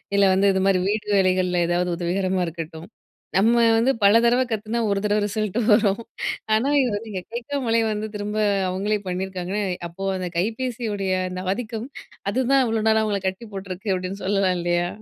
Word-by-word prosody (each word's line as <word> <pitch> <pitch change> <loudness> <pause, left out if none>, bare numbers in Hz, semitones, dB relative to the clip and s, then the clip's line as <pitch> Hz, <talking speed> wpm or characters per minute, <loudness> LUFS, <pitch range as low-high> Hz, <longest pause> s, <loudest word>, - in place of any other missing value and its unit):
இல்ல 200 - +4
வந்து 195 +1 +2
இதுமாரி 190 0 +2
வீட்டு 210 0 -1
வேலைகள்ல 185 -2 +2
ஏதாவது 175 +1 0
உதவிகரமா 185 +2 0
இருக்கட்டும். 165 0 -7 0.5
நம்ம 225 +4 +4 0.2
வந்து 240 +4 +3
பல 205 +3 +7
தடவை 245 +2 +4
கத்துனா 220 +2 -2
ஒரு 200 - +1
தடவ 210 0 +2
ரிசல்ட் 215 0 -2
வரும் 210 -1 +4 0.5
ஆனா 230 +6 +2
இது 250 - +1
வந்து 220 +1 -8 0.2
கேக்காமலே 235 -1 -1
வந்து 215 0 -2
திரும்ப 210 +1 -3 0.3
அவுங்களே 200 +3 0
பண்ணியிருக்காங்கன்னா, 185 +2 -3 0.3
அப்போ 175 +3 -9
அந்த 180 -1 -3
கைபேசியுடைய 220 -2 -2 0.2
அந்த 180 0 -5
ஆதிக்கம். 230 +1 -5 0.4
அதுதான் 260 +2 +3
இவ்ளோ 220 -1 0
நாளா 220 0 +3
அவங்கள 205 -3 -1
கட்டி 190 +5 -4
போட்டிருக்கு. 195 +1 -6
அப்பிடின்னு 185 +2 -4
சொல்லலாம் 195 -2 +2
இல்லயா 175 0 0
200 Hz, 155 wpm, -23 LUFS, 185-225 Hz, 0.5 s, பல